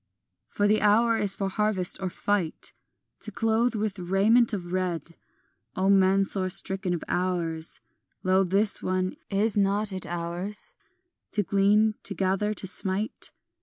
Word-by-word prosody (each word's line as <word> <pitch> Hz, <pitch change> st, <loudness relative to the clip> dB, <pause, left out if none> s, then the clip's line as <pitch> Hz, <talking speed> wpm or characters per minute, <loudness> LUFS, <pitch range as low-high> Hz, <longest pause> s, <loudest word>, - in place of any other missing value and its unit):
For 205 Hz, -, 0 dB
the 215 Hz, +1 st, +2 dB
hour 225 Hz, +3 st, +4 dB
is 205 Hz, -3 st, +1 dB
for 195 Hz, -, -2 dB
harvest 195 Hz, -2 st, +1 dB
or 190 Hz, -, -2 dB
fight 185 Hz, -3 st, -2 dB, 0.5 s
To -, -, -8 dB
clothe 225 Hz, +2 st, +1 dB
with 210 Hz, -2 st, -2 dB
raiment 205 Hz, +7 st, +3 dB
of 180 Hz, -4 st, -5 dB
red; 170 Hz, -3 st, -2 dB, 0.6 s
O 190 Hz, +1 st, +2 dB
men 195 Hz, 0 st, +4 dB
sore 190 Hz, -1 st, -1 dB
stricken 190 Hz, -1 st, +1 dB
of 170 Hz, -, -6 dB
hours, 170 Hz, -3 st, -1 dB, 0.4 s
Lo, 185 Hz, +1 st, +3 dB
this 195 Hz, +3 st, 0 dB
one, 185 Hz, 0 st, -1 dB
is 210 Hz, +1 st, +2 dB
not 200 Hz, +1 st, 0 dB
it 185 Hz, -, -2 dB
ours 175 Hz, +4 st, -5 dB, 0.6 s
To 210 Hz, -, +1 dB
glean, 205 Hz, +3 st, +3 dB
to 200 Hz, -, -5 dB
gather, 195 Hz, +4 st, 0 dB
to 190 Hz, -, -4 dB
smite? 190 Hz, +3 st, -1 dB
195 Hz, 145 wpm, -26 LUFS, 185-210 Hz, 0.6 s, hour